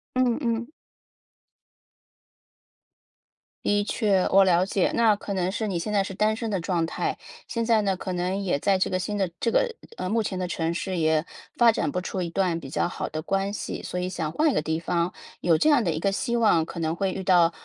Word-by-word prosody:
嗯 255 Hz, -2 st, +2 dB
嗯。 235 Hz, -2 st, -1 dB, 3.0 s
的 205 Hz, 0 st, +2 dB
确， 205 Hz, -3 st, +1 dB
我 195 Hz, 0 st, +7 dB
了 180 Hz, -1 st, +4 dB
解， 195 Hz, 0 st, +1 dB
那 225 Hz, -2 st, +4 dB
可 200 Hz, 0 st, -5 dB
能 185 Hz, -1 st, 0 dB
是 220 Hz, +2 st, -2 dB
你 190 Hz, -5 st, -1 dB
现 210 Hz, -, -3 dB
在 200 Hz, -2 st, +2 dB
是 195 Hz, -, -6 dB
单 215 Hz, +3 st, +1 dB
身 225 Hz, -1 st, -4 dB
的 195 Hz, -, 0 dB
状 170 Hz, -1 st, 0 dB
态。 165 Hz, -, -2 dB, 0.3 s
现 230 Hz, -1 st, -2 dB
在 225 Hz, -2 st, +4 dB
呢， 195 Hz, -2 st, 0 dB
可 185 Hz, 0 st, -4 dB
能 180 Hz, +2 st, -1 dB
也 175 Hz, -7 st, 0 dB
在 195 Hz, +5 st, +2 dB
这 185 Hz, -, 0 dB
个 185 Hz, -, 0 dB
新 205 Hz, +3 st, -3 dB
的 195 Hz, -2 st, +1 dB
这 230 Hz, -, 0 dB
个 -, -, +3 dB, 0.3 s
呃， -, -, -3 dB
目 225 Hz, +4 st, +1 dB
前 195 Hz, -3 st, -3 dB
的 185 Hz, -, -2 dB
城 165 Hz, -1 st, -1 dB
市 185 Hz, +2 st, -3 dB
也， 160 Hz, -1 st, +2 dB, 0.3 s
发 235 Hz, -1 st, +6 dB
展 150 Hz, -, -1 dB
不 180 Hz, -, -1 dB
出 185 Hz, +1 st, -4 dB
一 170 Hz, -, -2 dB
段 175 Hz, -1 st, 0 dB
比 135 Hz, -, -9 dB
较 155 Hz, -, 0 dB
好 -, -, -4 dB
的 155 Hz, 0 st, -5 dB
关 195 Hz, +2 st, 0 dB
系， 205 Hz, -, -5 dB
所 180 Hz, -, -4 dB
以 180 Hz, -, -2 dB
想 165 Hz, -4 st, -3 dB
换 310 Hz, -, +2 dB
一 -, -, -2 dB
个 -, -, +1 dB
地 160 Hz, +1 st, -1 dB
方。 170 Hz, +1 st, 0 dB, 0.3 s
有 165 Hz, -2 st, +3 dB
这 310 Hz, -, +4 dB
样 275 Hz, -5 st, +4 dB
的 180 Hz, -, 0 dB
一 155 Hz, -, -2 dB
个 195 Hz, +3 st, +1 dB
希 235 Hz, +4 st, -1 dB
望， 210 Hz, -8 st, +4 dB
可 170 Hz, -, -7 dB
能 160 Hz, 0 st, -1 dB
会 190 Hz, +1 st, -1 dB
遇 190 Hz, -, -5 dB
到 175 Hz, -3 st, +5 dB
190 Hz, 250 characters per minute, -25 LUFS, 170-210 Hz, 3.0 s, 我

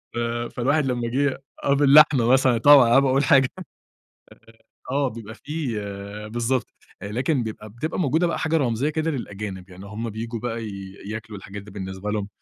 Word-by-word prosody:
ف -, -, -4 dB, 0.4 s
فالواحد 140 Hz, +4 st, +1 dB
لمّا 120 Hz, -2 st, -1 dB
جه 135 Hz, +1 st, 0 dB, 0.2 s
آه، 140 Hz, -, +3 dB
باللحمة 140 Hz, -3 st, +6 dB
مثلًا 130 Hz, -2 st, +4 dB
طبعًا 140 Hz, -3 st, +7 dB
قبل 135 Hz, -, +6 dB
ما 135 Hz, -, +2 dB
اقول 135 Hz, +2 st, +2 dB
حاجة 135 Hz, -3 st, +4 dB, 1.4 s
آه، 140 Hz, -1 st, +1 dB
بيبقى 110 Hz, -1 st, -9 dB
في 150 Hz, -6 st, -4 dB, 0.6 s
بالضبط، 120 Hz, +2 st, 0 dB, 0.4 s
لكن 125 Hz, +6 st, -1 dB
بيبقى 110 Hz, -1 st, -7 dB
بتبقى 145 Hz, -, -4 dB
موجودة 165 Hz, +2 st, +2 dB
بقى -, -, -2 dB
حاجة 160 Hz, +1 st, +1 dB
رمزية 130 Hz, +1 st, 0 dB
كده 160 Hz, +1 st, -1 dB
للأجانب، 100 Hz, -7 st, -6 dB
يعني 95 Hz, +2 st, -11 dB
هم 110 Hz, +3 st, -5 dB
بييجوا 115 Hz, +2 st, -5 dB
بقى 115 Hz, -1 st, -4 dB
ي 100 Hz, -2 st, -7 dB
ياكلوا 105 Hz, 0 st, -6 dB
الحاجات 100 Hz, +1 st, -9 dB
دي 105 Hz, 0 st, -13 dB
بالنسبة 95 Hz, +1 st, -5 dB
لهم 105 Hz, -2 st, -2 dB
120 Hz, 170 wpm, -23 LUFS, 105-140 Hz, 1.4 s, طبعًا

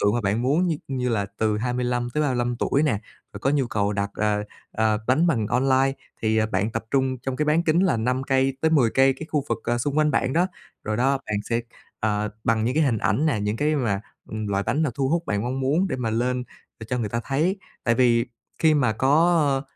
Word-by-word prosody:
tượng 100 Hz, +1 st, +2 dB
mà 120 Hz, -, +1 dB
bạn 105 Hz, +2 st, 0 dB
muốn, 150 Hz, +8 st, +2 dB
như 165 Hz, -3 st, 0 dB
như 130 Hz, -2 st, -1 dB
là 105 Hz, -4 st, 0 dB
từ 110 Hz, -1 st, +1 dB
25 125 Hz, +1 st, -1 dB
tới 150 Hz, -, +1 dB
35 120 Hz, -4 st, 0 dB
tuổi 140 Hz, +4 st, +1 dB
nè, 150 Hz, -4 st, +2 dB, 0.4 s
rồi -, -, -7 dB
có 135 Hz, -, +1 dB
nhu 140 Hz, -3 st, +1 dB
cầu 105 Hz, -3 st, 0 dB
đặt, 100 Hz, 0 st, -2 dB
ờ, 105 Hz, -1 st, 0 dB, 0.3 s
ờ, 110 Hz, -1 st, +1 dB
bánh 135 Hz, +7 st, +3 dB
bằng 120 Hz, -11 st, +1 dB
online 135 Hz, +3 st, +2 dB, 0.3 s
thì 110 Hz, 0 st, +2 dB
bạn 100 Hz, +4 st, +1 dB
tập 115 Hz, 0 st, -4 dB
trung 130 Hz, -2 st, +1 dB
trong 130 Hz, +1 st, -4 dB
cái 150 Hz, -, 0 dB
bán 155 Hz, +3 st, +3 dB
kính 170 Hz, +1 st, +2 dB
là 185 Hz, -9 st, +2 dB
5 125 Hz, +4 st, 0 dB
cây 135 Hz, 0 st, +1 dB
tới 160 Hz, -, +2 dB
10 135 Hz, -8 st, +4 dB
cây, 135 Hz, +2 st, +4 dB
cái 155 Hz, -, -6 dB
khu 150 Hz, -3 st, 0 dB
vực, -, -, -1 dB
ờ, 120 Hz, +1 st, 0 dB
xung 145 Hz, +5 st, -1 dB
quanh 155 Hz, 0 st, +3 dB
bạn 130 Hz, -2 st, 0 dB
đó. 175 Hz, +4 st, +3 dB, 0.4 s
Rồi 110 Hz, 0 st, -1 dB
đó, 135 Hz, +3 st, +2 dB
bạn 105 Hz, -, -1 dB
sẽ, 115 Hz, 0 st, +1 dB, 0.4 s
ờ, 105 Hz, -1 st, 0 dB, 0.2 s
bằng 115 Hz, -3 st, +2 dB
những 125 Hz, +4 st, 0 dB
cái 160 Hz, -, +3 dB
hình 120 Hz, -6 st, +1 dB
ảnh 115 Hz, +10 st, +1 dB
nè, 135 Hz, -9 st, +1 dB
những 105 Hz, +2 st, -1 dB
cái 150 Hz, +3 st, +1 dB
mà 110 Hz, -8 st, 0 dB, 0.3 s
ừm, 110 Hz, -1 st, -4 dB
loại 100 Hz, 0 st, 0 dB
bánh 145 Hz, +9 st, 0 dB
nào 145 Hz, -5 st, 0 dB
thu 135 Hz, +1 st, 0 dB
hút 170 Hz, +3 st, +1 dB
bạn 105 Hz, 0 st, -1 dB
mong 130 Hz, +3 st, -2 dB
muốn 155 Hz, +9 st, +1 dB
để -, -, -2 dB
mà 120 Hz, -3 st, -2 dB
lên, 125 Hz, +2 st, 0 dB, 0.4 s
để 110 Hz, -, -7 dB
cho 125 Hz, -, 0 dB
người 110 Hz, -3 st, -1 dB
ta 115 Hz, +3 st, -2 dB
thấy. 160 Hz, +8 st, 0 dB, 0.3 s
Tại 115 Hz, -, +3 dB
vì 120 Hz, -1 st, +3 dB, 0.3 s
khi 155 Hz, -1 st, +4 dB
mà 125 Hz, -6 st, +2 dB
có, 155 Hz, +9 st, +3 dB, 0.2 s
ơ, -, -, -8 dB
125 Hz, 250 wpm, -24 LUFS, 110-140 Hz, 0.4 s, 10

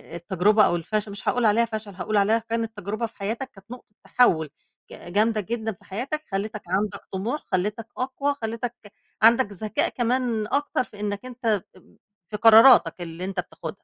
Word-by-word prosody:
التجربة 195 Hz, +5 st, +3 dB
أو -, -, +1 dB
الفشل 210 Hz, +5 st, -2 dB
مش 200 Hz, -, -9 dB
هاقول 245 Hz, -1 st, +1 dB
عليها 220 Hz, +2 st, +4 dB
فشل، 220 Hz, -2 st, -6 dB
هاقول 195 Hz, +4 st, -1 dB
عليها 210 Hz, +3 st, +3 dB
كانت 230 Hz, -1 st, -4 dB
تجربة 205 Hz, +4 st, -3 dB
في 225 Hz, -, -11 dB
حياتك 225 Hz, +6 st, -4 dB
كانت 195 Hz, +2 st, -17 dB
نقطة 250 Hz, -4 st, -11 dB
تَحوُّل 160 Hz, -11 st, +3 dB, 0.4 s
ج 175 Hz, -, -11 dB
جامدة 215 Hz, +2 st, +2 dB
جدًا 220 Hz, +2 st, -3 dB
في 205 Hz, 0 st, -16 dB
حياتك 265 Hz, +10 st, -4 dB
خلِّتك 210 Hz, +2 st, -3 dB
عندك 200 Hz, +2 st, -1 dB
طموح، 220 Hz, +10 st, -3 dB
خلِّتك 210 Hz, +5 st, -1 dB
أقوى، 275 Hz, +3 st, -1 dB
خلِّتك 230 Hz, +2 st, -3 dB, 0.5 s
عندك 230 Hz, +4 st, +6 dB
ذكاء 210 Hz, +2 st, -1 dB
كمان 240 Hz, -3 st, -1 dB
أكتر 285 Hz, +1 st, 0 dB
في 210 Hz, -4 st, -15 dB
إنك 205 Hz, +2 st, -3 dB
أنت 230 Hz, -6 st, -1 dB
ب 185 Hz, -, -21 dB, 0.3 s
في 210 Hz, -, -4 dB
قراراتك 225 Hz, -5 st, +7 dB
اللي 170 Hz, +1 st, -6 dB
أنت 190 Hz, -1 st, -4 dB
بتاخدها. 170 Hz, -2 st, -7 dB
215 Hz, 175 wpm, -24 LUFS, 195-230 Hz, 0.5 s, قراراتك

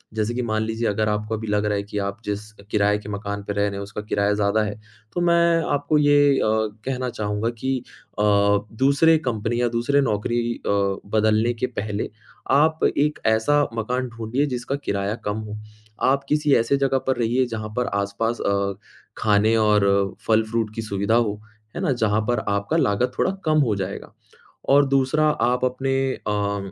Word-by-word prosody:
जैसे 110 Hz, +1 st, -1 dB
कि 125 Hz, -, -2 dB
मान 110 Hz, -2 st, -1 dB
लीजिए 110 Hz, +1 st, -2 dB
अगर 105 Hz, +1 st, 0 dB
आपको 105 Hz, +1 st, -2 dB
अभी 110 Hz, 0 st, -6 dB
लग 105 Hz, 0 st, +1 dB
रहा 105 Hz, 0 st, +1 dB
है 100 Hz, -, -2 dB
कि 105 Hz, +1 st, -7 dB
आप 100 Hz, +1 st, -3 dB
जिस 105 Hz, 0 st, -2 dB, 0.3 s
किराए 105 Hz, 0 st, +2 dB
के 105 Hz, -, -10 dB
मकान 100 Hz, 0 st, -4 dB
पे 100 Hz, -, -4 dB
रह 100 Hz, -, -1 dB
रहे 100 Hz, -, 0 dB
हैं 100 Hz, -, -5 dB
उसका 105 Hz, +1 st, -6 dB
किराया 100 Hz, 0 st, +2 dB
ज़्यादा 105 Hz, +1 st, +1 dB
है। 105 Hz, -1 st, -3 dB, 0.4 s
तो 175 Hz, -, -1 dB
मैं 170 Hz, -1 st, +3 dB
आपको 145 Hz, +1 st, +1 dB
ये 145 Hz, -1 st, +5 dB
अ, -, -, +1 dB, 0.4 s
कहना 130 Hz, -1 st, -2 dB
चाहूँगा 105 Hz, 0 st, -2 dB
कि 130 Hz, +2 st, 0 dB, 0.4 s
अ, 105 Hz, -, +2 dB, 0.5 s
दूसरे 140 Hz, +6 st, +4 dB
कंपनी 120 Hz, +1 st, -1 dB
या 120 Hz, -, +2 dB
दूसरे 120 Hz, +5 st, +1 dB
नौकरी 120 Hz, 0 st, 0 dB
अ, -, -, 0 dB, 0.5 s
बदलने 110 Hz, +2 st, +3 dB
के 120 Hz, +2 st, -2 dB
पहले 105 Hz, -4 st, -4 dB, 0.5 s
आप 160 Hz, +1 st, +2 dB
एक 150 Hz, +1 st, +1 dB
ऐसा 110 Hz, +7 st, +3 dB, 0.2 s
मकान 125 Hz, +3 st, -1 dB
ढूँढिए 120 Hz, +4 st, -2 dB
जिसका 125 Hz, +3 st, -3 dB
किराया 100 Hz, +1 st, -1 dB
कम 105 Hz, +1 st, -1 dB
हो। 105 Hz, -, -6 dB, 0.5 s
आप 140 Hz, 0 st, 0 dB
किसी 150 Hz, -1 st, +2 dB
ऐसे 115 Hz, +5 st, +2 dB
जगह 135 Hz, -1 st, +1 dB
पर 130 Hz, -, +1 dB
रहिए 120 Hz, +2 st, +1 dB
जहाँ 110 Hz, -1 st, -5 dB
पर 125 Hz, -, +1 dB, 0.2 s
आस-पास 115 Hz, +4 st, -2 dB
अ, 100 Hz, 0 st, 0 dB, 0.4 s
ख़ाने 110 Hz, +1 st, +3 dB
और 100 Hz, -2 st, +2 dB
फ़ल-फ्रूट 110 Hz, 0 st, +1 dB
की 115 Hz, -, -3 dB
सुविधा 100 Hz, 0 st, 0 dB
हो, 105 Hz, -3 st, +1 dB, 0.4 s
है -, -, -3 dB
ना? -, -, +1 dB
जहाँ 110 Hz, -3 st, +1 dB
पर 120 Hz, -2 st, +2 dB
आपका 100 Hz, 0 st, 0 dB
लागत 110 Hz, +5 st, +1 dB
थोड़ा -, -, +2 dB
कम 155 Hz, -1 st, +3 dB
हो 105 Hz, -, +1 dB
जाएगा। 95 Hz, 0 st, -5 dB, 0.6 s
और 140 Hz, +1 st, +6 dB
दूसरा 135 Hz, +3 st, +2 dB, 0.2 s
आप 125 Hz, +1 st, 0 dB
अपने 130 Hz, +1 st, -1 dB, 0.3 s
अ, 100 Hz, -1 st, -2 dB
110 Hz, 185 wpm, -23 LUFS, 105-130 Hz, 0.6 s, और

